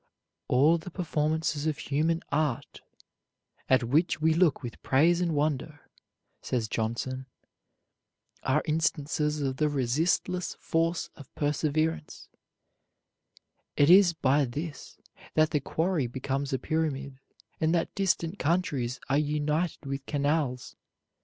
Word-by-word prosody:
"All 150 +7 +4
the 165 - -8
performances 160 -3 -1
of 155 - -1
human 160 +4 0
art, 145 -4 -1 0.9
at 130 -2 +4
which 155 +8 +1
we 160 +1 +3
look 165 -5 +2
with 120 - -7
praise 165 +6 +3
and 170 -3 0
wonder," 145 0 -2 0.5
says 120 -3 -1
Johnson, 120 +4 -3 1.1
"are 140 +3 +1
instances 150 -1 0
of 135 -2 -2
the 150 -1 +2
resistless 160 +6 0
force 165 +1 -1
of 140 -4 -13
perseverance: 155 +1 -1 1.5
it 145 +3 +6
is 185 -2 +7
by 140 -2 +2
this 145 +5 -7 0.4
that 155 0 +4
the 150 - +2
quarry 160 -1 0
becomes 135 +3 -3
a 130 - +1
pyramid, 140 -2 -2 0.4
and 160 0 +2
that 165 - -1
distant 190 -2 0
countries 145 -7 0
are 140 +1 +2
united 150 +2 -1
with 135 0 -5
canals. 145 -3 -1
150 Hz, 120 wpm, -28 LUFS, 135-160 Hz, 1.5 s, is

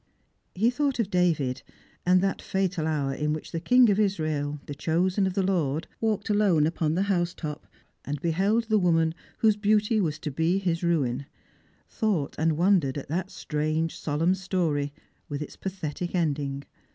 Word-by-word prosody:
He 220 +6 +3
thought 280 +1 0
of 220 -4 -1
David, 155 -8 +1 0.5
and 180 0 +5
that 195 0 -1
fatal 190 -4 -1
hour 145 -3 0
in 150 +2 -1
which 155 - -6
the 165 - -2
King 250 +8 +5
of 200 - +1
Israel, 155 -7 0
the 145 - -6
chosen 180 +6 +1
of 185 - -3
the 195 - +2
Lord, 165 -5 0
walked 215 -2 0
alone 200 -7 +3
up 165 +2 -3
on 155 0 +2
the 190 - +2
house 180 -3 0
top, 150 -1 -6 0.4
and 145 0 -4
beheld 195 - +1
the 220 -1 +2
woman 165 -3 +2 0.3
whose 215 -2 +4
beauty 210 +1 +2
was 155 -4 -1
to 155 -1 -5
be 160 +6 +1
his 175 -4 -1
ruin; 140 -6 0 0.6
thought 200 - -1
and 160 -1 +2
wondered 170 -7 +3
at 140 - -7
that 180 +4 -2
strange 160 -2 -2
solemn 160 +4 +1
story 175 -7 -1 0.4
with 145 - -3
its - - -10
pathetic 180 -2 -4
ending. 145 -4 -1
170 Hz, 175 wpm, -27 LUFS, 150-195 Hz, 0.6 s, and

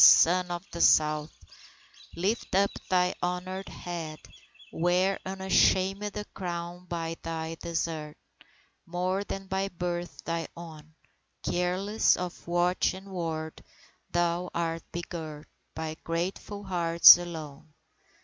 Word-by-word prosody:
Son 180 +2 +7
of 175 +1 -4
the 170 - -4
South, 155 0 +4 0.8
Lift 195 +4 -1
up 200 +1 +4 0.2
thy 180 -1 +3
honoured 185 +2 -3
head, 165 -3 -6 0.5
Wear 180 +3 +2
unashamed 190 +1 +2
a 210 - -4
crown 175 0 -5
by 165 -1 -4
thy 160 0 -4
desert 160 -2 -3 0.7
More 180 +3 -1
than 195 -1 -5
by 190 +1 -1
birth 175 -1 -4
thy 165 0 -2
own, 160 -2 -11 0.5
Careless 185 +4 +2
of 180 -1 -6
watch 175 +2 +2
and 195 +1 -11
ward; 160 -3 -4 0.5
thou 175 +1 0
art 165 -1 -1
begirt 160 -3 -6 0.3
By 160 0 -4
grateful 185 +4 -3
hearts 170 -2 +8
alone. 155 -4 -8
175 Hz, 110 wpm, -28 LUFS, 165-185 Hz, 0.8 s, hearts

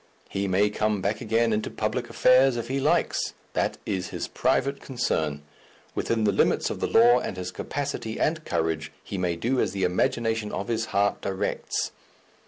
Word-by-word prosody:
He 100 0 -1
may 100 +2 +3
come 105 -1 0
back 100 +3 -1
again 115 0 +2
into 105 0 -1
public 115 +3 -2
affairs 130 0 +5
if 120 - -4
he 135 +1 0
likes 155 +5 +1 0.2
that - - 0
is 95 -2 -2
his - - -4
private 140 +1 0
concern. 80 - -1 0.5
Within 115 -1 0
the 105 - +4
limits 100 - +2
of - - -5
the - - 0
law 120 +2 +6
and 95 - -5
his 90 0 -4
capacity 140 -6 -4
and 155 0 +1
courage, 80 - -1
he 95 - -5
may 90 -2 0
do 120 +9 0
as - - +1
the 95 -1 -2
imagination 115 +3 0
of 100 - -4
his 115 -1 0
heart 100 -1 +1
directs. 95 -1 -2
110 Hz, 180 wpm, -26 LUFS, 95-120 Hz, 0.5 s, law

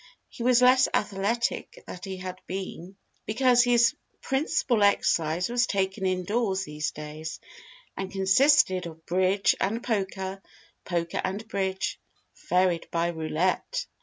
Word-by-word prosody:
He - - -11
was 250 +1 +4
less 255 +1 +6
athletic 220 - -1
that 180 - -8
he 190 -1 -5
had 185 0 -7
been, 190 0 -6 0.3
because 245 +2 +4
his 240 -1 +4 0.3
principal 265 -4 0
exercise 175 -4 +2
was 245 +1 +1
taken 190 -1 -1
indoors 190 +2 0
these 150 -3 -3
days, 155 +2 -7 0.6
and 190 -1 -5
consisted 195 - +3
of 160 0 -12
bridge 185 +3 +2
and 225 +5 -1
poker, 195 -3 -2 0.4
poker 170 -1 -2
and 205 +4 -4
bridge, 190 -3 -2 0.5
varied 180 -2 +2
by 170 0 0
roulette. 170 - -1
190 Hz, 125 wpm, -27 LUFS, 180-230 Hz, 0.6 s, less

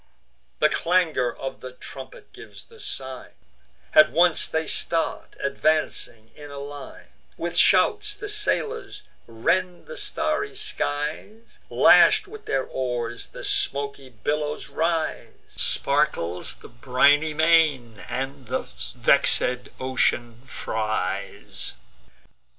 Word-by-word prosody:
The - - +4
clangour 165 -8 +1
of 135 +2 -7
the 130 0 -8
trumpet - - -11
gives - - -12
the 455 -1 -18
sign; 130 - -7 0.6
At 155 0 +7
once 175 0 +3
they 160 0 -1
start, 165 -1 -2
advancing 140 -6 -1
in 145 -1 -11
a 140 - -9
line: 140 -1 -9 0.3
With - - -4
shouts 420 -1 +3
the 415 0 -7
sailors 425 +2 -2 0.2
rend 175 +11 -1
the 485 - -9
starry 415 0 -1
skies; 215 - -4
Lash'd - - +6
with 430 +2 -12
their 135 - 0
oars, 120 -3 -4
the - - -10
smoky 140 -1 -2
billows 145 +5 -3
rise; 160 +2 -1 0.2
Sparkles 140 - +1
the - - -14
briny 140 +6 +3
main, 155 -8 +3
and 135 0 -4
the 130 +2 -1 0.4
vex'd 125 0 +3
ocean 120 -2 0
fries. 110 - -3
145 Hz, 110 wpm, -24 LUFS, 130-170 Hz, 0.6 s, At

